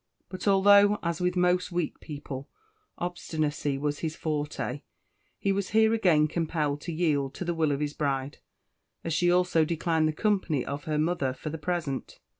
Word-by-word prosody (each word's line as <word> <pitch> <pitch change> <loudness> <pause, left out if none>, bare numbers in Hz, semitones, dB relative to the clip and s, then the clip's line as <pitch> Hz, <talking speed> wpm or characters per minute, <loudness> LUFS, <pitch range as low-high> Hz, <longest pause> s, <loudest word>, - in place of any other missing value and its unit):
But 185 +2 -6
although, 200 +1 +6
as 170 0 -2
with 180 0 +1
most 180 0 +2
weak 175 -2 -2
people, 140 -3 -7 0.5
obstinacy 155 -5 -2
was 145 +1 -2
his 155 -1 -3
forte, 150 -3 -3 0.6
he 195 - 0
was 195 0 -1
here 220 0 +4
again 175 -9 +4
compelled 155 -3 -1
to 170 - -5
yield 150 -5 0
to 180 - -5
the 175 - 0
will 160 -3 +1
of 140 +1 -1
his 145 -1 -2
bride, 140 -2 -2 0.6
as 165 - -2
she 175 +3 +3
also 180 -2 +3
declined 160 0 +1
the - - +1
company 185 - 0
of 140 +1 -5
her 155 -1 -1
mother 155 -4 0
for 150 +4 -6
the 160 - -5
present. 155 -4 -3
160 Hz, 175 wpm, -28 LUFS, 145-180 Hz, 0.6 s, although